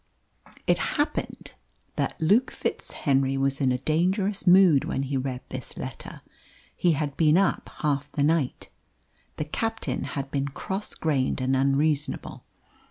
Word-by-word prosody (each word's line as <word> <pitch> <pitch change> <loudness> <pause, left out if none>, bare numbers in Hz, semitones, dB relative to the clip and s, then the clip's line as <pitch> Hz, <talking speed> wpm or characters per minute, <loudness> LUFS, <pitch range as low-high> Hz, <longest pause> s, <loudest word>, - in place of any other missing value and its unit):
It - - +3 0.2
happened 295 +1 -2 0.4
that - - -2
Luke 210 +11 +3
FitzHenry 135 -1 -1
was 135 +1 0
in 130 -2 +3
a 125 - +1
dangerous 185 - 0
mood 175 -6 +7
when 135 - -2
he 135 +1 -3
read 130 -1 -2
this 130 -2 -7
letter. 130 -1 -7 0.5
He 175 -2 +3
had 145 -2 -2
been 155 0 +5
up 195 -1 +1
half 145 -1 0
the 145 - +1
night. 150 -3 0 0.7
The 150 - -2
captain 220 - -2
had 140 -1 -5
been 140 0 -1
cross 190 +8 -5
grained 140 -5 0
and 130 +1 +1
unreasonable. 140 +2 0
145 Hz, 140 wpm, -26 LUFS, 135-170 Hz, 0.7 s, mood